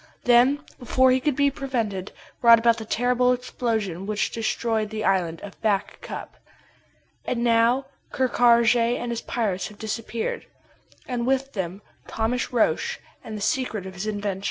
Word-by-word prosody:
Then, 250 +5 +4 0.2
before 260 +1 +3
he 255 - +3
could 285 +1 0
be 280 0 +3
prevented, 230 -9 -3 0.3
brought 235 -1 +8
about 230 0 +3
the 220 - -6
terrible 250 +2 +2
explosion 220 -7 -3
which 215 0 -1
destroyed 225 -1 -1
the 215 0 -4
island 175 -4 +1
of 200 -1 -11
Back 205 -3 -1
Cup. - - -8 0.9
And 235 -1 -2
now 235 +3 +3 0.3
Ker 260 -1 +1
Karraje 235 -1 +4
and 240 0 -4
his 235 - -3
pirates 205 -6 -2
have 210 - -13
disappeared 225 +1 -4 0.6
and 245 -1 -2
with 270 +1 0
them 190 0 -4 0.2
Thomas 230 +3 -1
Roch 240 -3 +1 0.2
and 215 -1 -6
the - - -7
secret 220 -3 -1
of 190 - -7
his 190 +3 -5
invention. 205 -2 -2
230 Hz, 155 wpm, -24 LUFS, 210-250 Hz, 0.9 s, brought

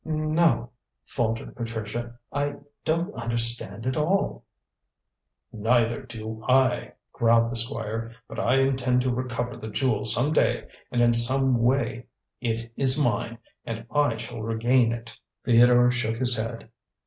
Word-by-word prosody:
"No," 155 -6 +1 0.3
faltered 115 -2 -3
Patricia. 115 0 -5 0.2
"I 145 0 -1 0.3
don't 170 +5 -1
understand 115 -2 -1
at 130 0 -1
all." 155 - 0 1.1
"Neither 115 +2 +1
do 110 -3 -8
I," 130 -1 +2 0.2
growled 115 0 +3
the - - -4
Squire; 115 -1 0
"but - - -7
I 125 - +2
intend 130 -2 +1
to 125 0 0
recover 120 -1 -3
the 110 - -8
jewel 110 -2 0
some 125 +7 +2
day - - +1 0.2
and 120 - +1
in 120 0 +4
some 130 +1 +3
way. 120 -1 0 0.3
It 115 -1 -3
is 135 +1 +4
mine, 115 -3 0 0.3
and 115 0 -6
I 145 -6 +2
shall 110 - -6
regain 115 +2 +2
it." 115 0 -6 0.3
Theodore 120 +1 +5
shook 115 -2 -2
his 125 0 +1
head. 115 0 -5
120 Hz, 135 wpm, -25 LUFS, 115-130 Hz, 1.1 s, Theodore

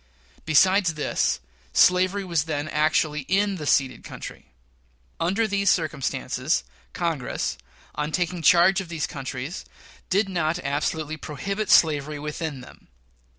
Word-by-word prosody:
Besides 180 +2 +4
this, 150 - 0 0.3
slavery 185 - +4
was 170 -5 0
then 150 -2 -3
actually 155 0 +1
in 200 +1 +1
the 150 -3 -5
ceded 130 -5 +1
country. - - -9 0.7
Under 195 +7 +1
these 200 -1 +1
circumstances, 155 -7 0 0.3
Congress, - - -2 0.4
on 150 +1 -3
taking 175 0 -1
charge 180 +5 +5
of 180 - -10
these 160 -3 -2
countries, 135 +3 -6 0.5
did 200 +2 +2
not 170 -3 0
absolutely 150 +2 -2
prohibit 195 +9 -4
slavery 150 -2 +4
within 150 -1 -5
them. 125 - -15
160 Hz, 120 wpm, -24 LUFS, 150-185 Hz, 0.7 s, charge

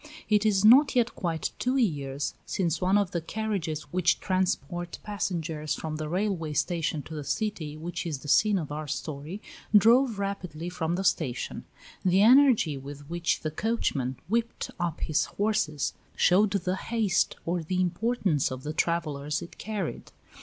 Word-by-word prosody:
It 210 0 +4
is 200 -1 +3
not 265 +6 +7
yet 240 -1 +2
quite 165 -4 -2
two 255 +2 +1
years 145 - -1
since 170 -4 -1
one 185 +2 +3
of 200 -3 +1
the 170 - -2
carriages 180 -4 -3
which 180 -1 +2
transport 175 -2 -1
passengers 165 -7 -2
from 155 -1 -4
the 155 -1 -4
railway 180 -4 -1
station 160 -1 -1
to 160 - -10
the 150 -2 -4
city 160 -3 -3
which 170 +2 -4
is 155 -4 -2
the 150 - -10
scene 210 +7 +4
of 155 -5 -4
our 150 +1 -4
story, 150 +7 -5 0.3
drove 230 +2 +5
rapidly 180 -5 -4
from 170 -1 -2
the 190 - -2
station; 140 -9 -1 0.4
the 190 +2 +4
energy 240 - +5
with 140 +1 -9
which 175 0 0
the 155 - -2
coachman 150 - -1
whipped 230 +3 -1
up 170 -2 -2
his 155 -3 +1
horses 205 -9 0 0.2
showed 195 +4 +4
the 190 -1 -1
haste 215 -4 +1
or 175 +1 0
the 180 +3 -2
importance 185 - +1
of 130 0 -6
the 150 - -4
travellers 150 -3 -1
it - - -12
carried. 205 -5 -4
175 Hz, 160 wpm, -28 LUFS, 155-205 Hz, 0.4 s, not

